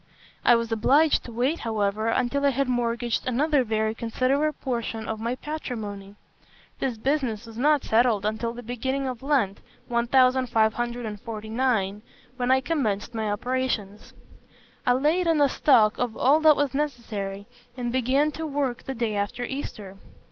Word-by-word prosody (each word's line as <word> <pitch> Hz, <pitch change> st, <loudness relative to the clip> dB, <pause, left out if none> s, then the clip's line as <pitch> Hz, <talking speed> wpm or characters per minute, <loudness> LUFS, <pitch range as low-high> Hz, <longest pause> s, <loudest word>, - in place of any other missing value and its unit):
I 240 Hz, -, +6 dB
was 230 Hz, 0 st, -1 dB
obliged 280 Hz, +8 st, +3 dB
to 240 Hz, -, -8 dB
wait, 255 Hz, +8 st, 0 dB
however, 215 Hz, -1 st, -1 dB
until 255 Hz, +4 st, 0 dB
I 280 Hz, -, +5 dB
had 275 Hz, 0 st, 0 dB
mortgaged 240 Hz, -1 st, -1 dB
another 280 Hz, +3 st, +2 dB
very 220 Hz, -1 st, 0 dB
considerable 260 Hz, +6 st, 0 dB
portion 230 Hz, -3 st, -3 dB
of 220 Hz, -1 st, -3 dB
my 235 Hz, +3 st, -2 dB
patrimony. 215 Hz, -10 st, -6 dB, 0.6 s
This 255 Hz, -4 st, -2 dB
business 245 Hz, -3 st, -1 dB
was 225 Hz, -1 st, -11 dB
not 290 Hz, +4 st, +3 dB
settled 220 Hz, -3 st, +2 dB
until 220 Hz, +2 st, -1 dB
the 240 Hz, +1 st, -9 dB
beginning 260 Hz, +3 st, -2 dB
of 250 Hz, -3 st, -5 dB
Lent, 265 Hz, -9 st, +1 dB, 0.3 s
1549, 235 Hz, -3 st, +1 dB, 0.4 s
when 250 Hz, -1 st, -1 dB
I 260 Hz, 0 st, +4 dB
commenced 245 Hz, -9 st, -1 dB
my 220 Hz, -2 st, -2 dB
operations. 220 Hz, -2 st, -3 dB, 0.7 s
I 245 Hz, -, +6 dB
laid 310 Hz, +7 st, +2 dB
in 325 Hz, -2 st, +3 dB
a 285 Hz, -, +5 dB
stock 230 Hz, -6 st, +3 dB
of 245 Hz, -3 st, -2 dB
all 285 Hz, +5 st, +4 dB
that 310 Hz, -1 st, +6 dB
was 285 Hz, -3 st, 0 dB
necessary, 220 Hz, -9 st, -3 dB, 0.3 s
and 240 Hz, -1 st, -2 dB
began 260 Hz, +4 st, +2 dB
to 320 Hz, +1 st, -5 dB
work 275 Hz, -4 st, -2 dB
the 265 Hz, -, -6 dB
day 225 Hz, -3 st, -1 dB
after 205 Hz, +4 st, -2 dB
Easter. 210 Hz, -7 st, -6 dB
245 Hz, 150 wpm, -25 LUFS, 220-270 Hz, 0.7 s, I